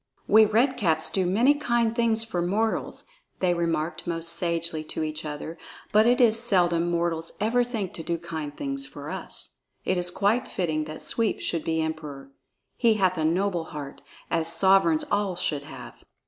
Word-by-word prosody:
"We 220 Hz, +1 st, +7 dB
Red 235 Hz, +5 st, +2 dB
Caps 160 Hz, -5 st, +1 dB
do 190 Hz, -2 st, +1 dB
many 230 Hz, +10 st, +4 dB
kind 235 Hz, -5 st, 0 dB
things 230 Hz, -2 st, +2 dB
for 185 Hz, -6 st, -2 dB
mortals," 210 Hz, +6 st, -1 dB, 0.3 s
they 180 Hz, -2 st, +2 dB
remarked 165 Hz, 0 st, -2 dB
most 165 Hz, -1 st, 0 dB
sagely 170 Hz, -2 st, -2 dB
to 160 Hz, -, -4 dB
each 155 Hz, 0 st, -4 dB
other, 150 Hz, +2 st, -6 dB, 0.3 s
"but 215 Hz, +2 st, +5 dB
it 245 Hz, +2 st, +4 dB
is 230 Hz, -2 st, +5 dB
seldom 175 Hz, -7 st, +2 dB
mortals 170 Hz, -1 st, -1 dB
ever 230 Hz, +4 st, +2 dB
think 225 Hz, -6 st, -4 dB
to -, -, -6 dB
do 170 Hz, +1 st, -1 dB
kind 160 Hz, -3 st, -6 dB
things 275 Hz, -1 st, -3 dB
for -, -, -8 dB
us. -, -, -7 dB, 0.3 s
It 185 Hz, -, +1 dB
is 175 Hz, 0 st, +2 dB
quite 210 Hz, +7 st, +1 dB
fitting 155 Hz, -4 st, -1 dB
that 155 Hz, 0 st, -8 dB
Sweep 230 Hz, -2 st, 0 dB
should 165 Hz, -2 st, -2 dB
be 160 Hz, 0 st, 0 dB
Emperor; 150 Hz, -4 st, -6 dB, 0.4 s
he 230 Hz, -3 st, +3 dB
hath 185 Hz, -3 st, +2 dB
a -, -, 0 dB
noble 175 Hz, +1 st, +1 dB
heart, 145 Hz, -3 st, -8 dB, 0.3 s
as 165 Hz, 0 st, +1 dB
sovereigns 170 Hz, -2 st, +4 dB
all 205 Hz, -3 st, +1 dB
should 150 Hz, -5 st, -2 dB
have." -, -, -11 dB
175 Hz, 175 wpm, -26 LUFS, 160-220 Hz, 0.4 s, We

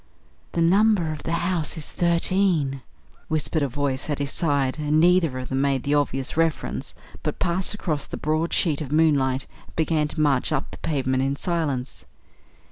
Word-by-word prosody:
"The 170 Hz, -, 0 dB
number 195 Hz, -1 st, +3 dB
of 155 Hz, -, -6 dB
the 165 Hz, -, -3 dB
house 175 Hz, -2 st, -1 dB
is 155 Hz, -, -6 dB
thirteen," 170 Hz, -5 st, +1 dB, 0.5 s
whispered 155 Hz, 0 st, 0 dB
a 140 Hz, -, +2 dB
voice 135 Hz, +2 st, -2 dB
at 145 Hz, -, 0 dB
his 140 Hz, -1 st, -2 dB
side; 145 Hz, -4 st, 0 dB
and 150 Hz, +1 st, +2 dB
neither 170 Hz, -5 st, +4 dB
of 130 Hz, 0 st, -5 dB
them 130 Hz, 0 st, 0 dB
made 140 Hz, -2 st, +1 dB
the 145 Hz, -, 0 dB
obvious 135 Hz, -2 st, 0 dB
reference, 165 Hz, -2 st, -1 dB, 0.3 s
but -, -, -3 dB
passed 185 Hz, +4 st, 0 dB
across 155 Hz, -8 st, -2 dB
the -, -, -6 dB
broad 155 Hz, +2 st, 0 dB
sheet 155 Hz, -4 st, +1 dB
of 140 Hz, -3 st, -5 dB
moonlight 140 Hz, -4 st, +2 dB, 0.2 s
and -, -, -20 dB
began 160 Hz, -1 st, +1 dB
to 155 Hz, -, -6 dB
march 145 Hz, -2 st, +2 dB
up 150 Hz, -3 st, -1 dB
the -, -, -10 dB
pavement 130 Hz, -4 st, 0 dB
in 135 Hz, +1 st, 0 dB
silence. 145 Hz, -5 st, -2 dB
150 Hz, 180 wpm, -24 LUFS, 135-165 Hz, 0.5 s, neither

